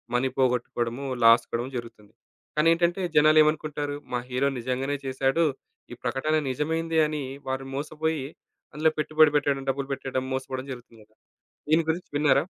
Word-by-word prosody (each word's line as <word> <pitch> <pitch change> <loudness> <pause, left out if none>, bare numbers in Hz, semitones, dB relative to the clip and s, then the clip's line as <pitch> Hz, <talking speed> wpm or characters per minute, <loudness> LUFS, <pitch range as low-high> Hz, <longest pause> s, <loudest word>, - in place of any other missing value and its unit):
Money 130 +2 +2
పోగొట్టుకోవడము, 125 0 0 0.2
loss 115 +1 +7
కావడం 120 +2 -2
జరుగుతుంది. 110 -3 -10 0.4
కానేంటంటే 170 +3 +3 0.2
జనాలేమనుకుంటారు? 155 -1 +3 0.2
"మా 125 - +1
హీరో 130 +3 +1
నిజంగానే 130 +4 -2
చేశాడు. 135 +5 +1 0.5
ఈ - - -6
ప్రకటన 135 +5 0
నిజమైంది" 160 +4 0
అని 150 -1 -3 0.3
వారు 130 0 -2
మోసపోయి 155 0 -2 0.5
అందులో 155 +1 +3
పెట్టుబడి 155 0 +4
బెట్టడం, 140 -2 +1
డబ్బులు 135 0 -1
బెట్టడం, 130 -1 -3
మోసపోవడం 130 0 -3
జరుగుతుంది 120 -3 -11
గదా! 110 +1 -30 0.5
దీని 160 +2 +4
గురించి 170 +3 -1
విన్నారా? 145 0 +4
140 Hz, 135 wpm, -26 LUFS, 130-155 Hz, 0.5 s, loss